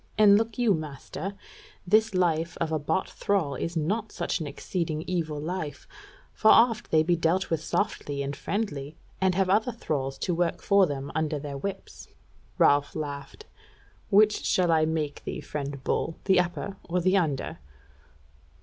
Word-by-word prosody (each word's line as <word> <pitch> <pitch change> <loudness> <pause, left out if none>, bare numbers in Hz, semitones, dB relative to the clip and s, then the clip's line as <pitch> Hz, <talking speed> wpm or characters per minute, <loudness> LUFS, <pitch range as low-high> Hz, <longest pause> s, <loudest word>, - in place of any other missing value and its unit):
And 205 -1 +7
look 225 +1 0
you, 240 -4 +3
master, 155 +4 -5 0.5
this 215 +2 +3
life 170 -2 +1
of 165 -1 -1
a 155 - +1
bought 160 +5 -1
thrall 190 -8 -1
is 170 +5 -3
not 205 +8 -1
such - - -2
an 155 - -4
exceeding 155 +2 -3
evil 160 -5 -2
life; 160 -1 -5 0.5
for 215 - +1
oft 230 -1 +5
they 155 -1 +4
be 175 +2 +2
dealt 170 +3 0
with 160 -1 0
softly 140 -1 -1
and 140 +1 -4
friendly, 150 -5 -3 0.3
and 190 -1 +3
have 190 0 +2
other 215 +6 +2
thralls 135 - -3
to 180 - -1
work 170 0 0
for 200 -2 +5
them 140 -1 -4
under 155 -1 -1
their 145 -1 -6
whips." 195 +8 -6 0.5
Ralph 145 0 +3
laughed: 145 - -6 0.6
"Which 210 +1 +4
shall 180 -2 +2
I 160 -1 +4
make 155 -2 -2
thee, - - -4
friend 140 -2 -5
Bull, 165 - -1
the 190 -2 +5
upper 180 +2 -2
or 180 +2 +1
the 185 +2 +2
under?" 150 - -1
165 Hz, 165 wpm, -27 LUFS, 150-195 Hz, 0.6 s, And